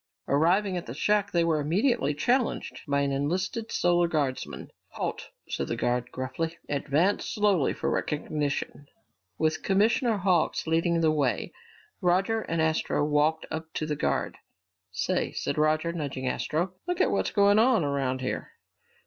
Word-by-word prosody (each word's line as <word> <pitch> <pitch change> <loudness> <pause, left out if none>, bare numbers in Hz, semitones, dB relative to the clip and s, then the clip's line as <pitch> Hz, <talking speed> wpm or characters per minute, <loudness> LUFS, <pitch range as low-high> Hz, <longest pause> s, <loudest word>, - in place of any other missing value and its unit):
Arriving 180 +7 +2
at 175 - -4
the - - -6
shack, 205 -1 +1
they 170 -2 +2
were 165 -2 +2
immediately 155 - +1
challenged 245 - 0
by 140 0 +1
an 140 0 0
enlisted 185 - -2
Solar 175 0 +3
Guardsman. 145 -6 -3 0.2
"Halt!" - - -4 0.2
said - - -3
the - - -2
guard 125 0 -1
gruffly. 160 +6 -3
"Advance 150 +7 +1
slowly 205 - +2
for - - -3
recognition!" 145 -1 -2 0.5
With 155 0 0
Commissioner 215 +3 +2
Hawks 180 -3 +1
leading 165 +1 +1
the 160 -1 +4
way, 140 -8 0 0.5
Roger 190 +5 +2
and 165 -5 -3
Astro 160 -2 +1
walked 150 +2 +1
up 160 0 -5
to 155 - -1
the 150 -1 -2
guard. - - -1 0.5
"Say," 90 - -1
said - - -2
Roger, 155 +2 +2
nudging 140 -5 -4
Astro, 170 +7 -1
"look 355 0 -1
at - - +3
what's - - 0
going 205 0 +4
on 230 -5 +4
around 135 -2 -1
here!" 130 - -4
160 Hz, 150 wpm, -27 LUFS, 145-195 Hz, 0.5 s, the